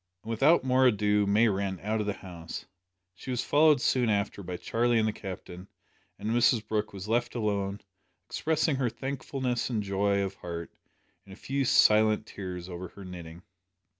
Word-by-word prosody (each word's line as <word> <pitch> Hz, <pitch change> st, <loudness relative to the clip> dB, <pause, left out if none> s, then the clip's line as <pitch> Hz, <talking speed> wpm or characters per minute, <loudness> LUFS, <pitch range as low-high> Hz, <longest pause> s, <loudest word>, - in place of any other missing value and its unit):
And 115 Hz, -, -5 dB
without 140 Hz, +9 st, +4 dB
more 130 Hz, 0 st, +4 dB
ado 105 Hz, -2 st, +2 dB
May 105 Hz, +4 st, +4 dB
ran 95 Hz, -2 st, -1 dB
out 110 Hz, +2 st, 0 dB
of 105 Hz, -, -3 dB
the 105 Hz, -, 0 dB
house. 85 Hz, -3 st, -7 dB, 0.5 s
She 95 Hz, -, -11 dB
was 125 Hz, -2 st, -1 dB
followed 150 Hz, -1 st, +5 dB
soon 125 Hz, -2 st, +2 dB
after 100 Hz, -1 st, -1 dB
by 90 Hz, -1 st, -5 dB
Charlie 120 Hz, +5 st, +1 dB
and 110 Hz, -1 st, +2 dB
the 110 Hz, -, -1 dB
Captain, 95 Hz, -2 st, -8 dB, 0.5 s
and 110 Hz, -, -3 dB
Mrs 115 Hz, -2 st, +3 dB
Brooke 105 Hz, 0 st, -1 dB
was 95 Hz, 0 st, -8 dB
left 120 Hz, +2 st, 0 dB
alone, 100 Hz, -3 st, -1 dB, 0.4 s
expressing 155 Hz, -2 st, 0 dB
her 130 Hz, -3 st, +1 dB
thankfulness 130 Hz, 0 st, -3 dB
and 110 Hz, -4 st, -1 dB
joy 100 Hz, 0 st, +1 dB
of 95 Hz, 0 st, -3 dB
heart 85 Hz, -3 st, -7 dB, 0.6 s
in -, -, -13 dB
a -, -, -9 dB
few 135 Hz, +5 st, -2 dB
silent 110 Hz, -4 st, +4 dB
tears 90 Hz, -4 st, -7 dB
over 90 Hz, 0 st, -6 dB
her 100 Hz, +3 st, -12 dB
knitting. 85 Hz, -1 st, -9 dB
105 Hz, 175 wpm, -29 LUFS, 95-120 Hz, 0.6 s, followed